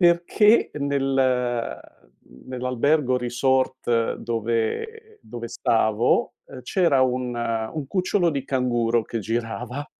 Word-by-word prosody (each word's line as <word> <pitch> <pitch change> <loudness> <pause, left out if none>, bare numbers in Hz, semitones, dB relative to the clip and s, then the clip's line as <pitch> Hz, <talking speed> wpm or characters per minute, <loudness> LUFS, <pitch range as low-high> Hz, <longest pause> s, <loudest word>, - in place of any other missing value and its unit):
perché 175 +6 +4
nel 140 -2 -1
ehm, 125 -2 0 0.7
nell'albergo 130 +2 +1
resort 125 -1 0
dove 120 - -3
dove 120 -1 -8
stavo, 110 0 +1
ehm, 130 - -11
c'era 170 -8 +2
un 125 -1 -1
ehm, 115 -1 -2
un 150 -4 -4
cucciolo 180 0 +1
di 140 -3 -3
canguro 120 -3 +1
che 115 - -4
girava 120 +5 -4
125 Hz, 110 wpm, -23 LUFS, 120-145 Hz, 0.7 s, perché